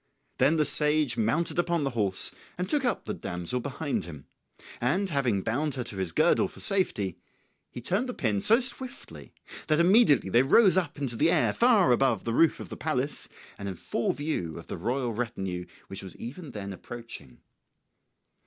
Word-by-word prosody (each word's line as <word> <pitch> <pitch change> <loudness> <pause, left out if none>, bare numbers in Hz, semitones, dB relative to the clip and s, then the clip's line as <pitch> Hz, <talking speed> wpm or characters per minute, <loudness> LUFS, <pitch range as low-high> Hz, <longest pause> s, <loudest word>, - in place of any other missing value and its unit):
Then 140 +5 +3
the 150 - +2
sage 150 -5 +5
mounted 150 +11 0
upon 170 -2 0
the 135 - -2
horse 100 -5 +2 0.3
and 180 +1 -3
took 290 +3 0
up 245 - -1
the - - -4
damsel 90 - -3
behind 140 - -4
him; 75 -5 -11 0.6
and 175 +12 0
having 120 -9 0
bound 140 +5 -2
her 125 - -3
to 110 -4 -8
his 95 -3 -3
girdle 170 +5 +2
for - - -15
safety, 110 - +2 0.5
he 125 - -9
turned 200 - -1
the 250 - -5
pin 105 -5 -1
so 230 +4 +6
swiftly 260 +1 0 0.4
that 155 0 +2
immediately 175 - +4
they 120 - +5
rose 185 - +4
up 175 -6 -1
into 135 -5 -3
the 155 +8 +2
air 170 -2 +2
far 225 - +3
above 120 -4 +1
the 115 - -3
roof 165 +6 +3
of - - -9
the - - -7
palace 145 -2 -3 0.3
and 100 0 -5
in 95 - -6
full 115 - -2
view 145 - -4
of - - -10
the - - -6
royal 125 0 -2
retinue 95 -6 -4 0.2
which 95 +1 -5
was 95 - -11
even 145 +7 -9
then 100 -4 -7
approaching. 115 - -11
135 Hz, 185 wpm, -27 LUFS, 110-170 Hz, 0.6 s, so